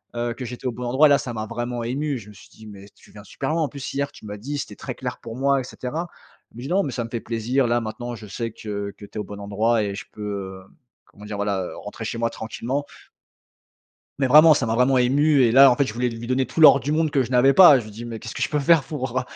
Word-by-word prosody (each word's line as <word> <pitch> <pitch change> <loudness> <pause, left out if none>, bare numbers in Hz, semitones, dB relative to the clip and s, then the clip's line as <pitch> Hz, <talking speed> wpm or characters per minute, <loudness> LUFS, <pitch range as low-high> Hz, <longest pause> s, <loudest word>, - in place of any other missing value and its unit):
heu, 120 0 -2
que 130 - -8
j'étais 125 +2 -9
au - - 0
bon 125 +2 -7
endroit 130 +5 +4
et - - +1
là, 140 - +5
ça 120 - -5
m'a 110 -1 -4
vraiment 120 +1 -4
ému. 140 +3 -2
Je 105 -2 -12
me - - -13
suis 100 - -17
dit: 110 - -16
«Mais, 100 -1 -12
tu - - -21
viens 105 -1 -13
super 155 - -4
loin, 165 0 0
en 150 - 0
plus, 140 -2 -7
hier, 140 0 -2
tu - - -15
m'as 105 0 -7
dit, 145 +7 -5
c'était 105 -7 -6
très 130 - -7
clair, 125 -1 -6
pour 115 0 -9
moi 140 0 +2
et - - -7
cetera». 150 +7 -5 0.4
Elle - - -17
me - - -7
dit: - - -5
«Non, 195 +3 +2
mais, 140 - -4
ça 120 - -3
me 115 - -8
fait 115 - -3
plaisir. 120 +3 -1
Là, 120 +1 +2
maintenant, 120 +2 -6
je 110 - -11
sais 115 +3 -4
que 100 -2 -5
que 105 - -11
tu - - -19
es - - -4
au - - -2
bon 100 0 -9
endroit 105 +3 0
et 100 -1 -3
je - - -8
peux, 100 -3 -6
hem, - - -25 0.3
comment 105 +1 -15
dire, 105 -1 -6
voilà, 100 -2 -1
heu, - - -8
rentrer - - -8
chez - - -4
moi 115 0 0
tranquillement» 125 +5 -4 1.3
mais, 135 - +2
vraiment 155 +4 +8
ça 130 -5 +1
m'a 110 - 0
vraiment 125 +2 +3
ému 140 +3 +3
et 115 -2 +3
là, 135 0 +8
en 120 - +2
fait, 140 - +2
je 105 - -6
voulais 125 +1 0
lui 115 0 -8
don 120 - -7
donner 130 0 +1
tout 165 - -4
l'or 145 -3 +8
du 145 - -2
monde 155 -1 +1
que 135 -2 +2
je 125 - -7
n'avais 130 +2 +4
pas 175 -7 +9
et - - 0
je - - -9
lui - - -10
dis: 115 +3 -9
«Mais, 115 -1 -6
qu'est-ce 115 - -8
que - - -4
je - - 0
peux 150 - 0
faire 150 +1 +4
pour, 130 -4 -3
heu, - - -1
120 Hz, 315 wpm, -23 LUFS, 110-135 Hz, 1.3 s, pas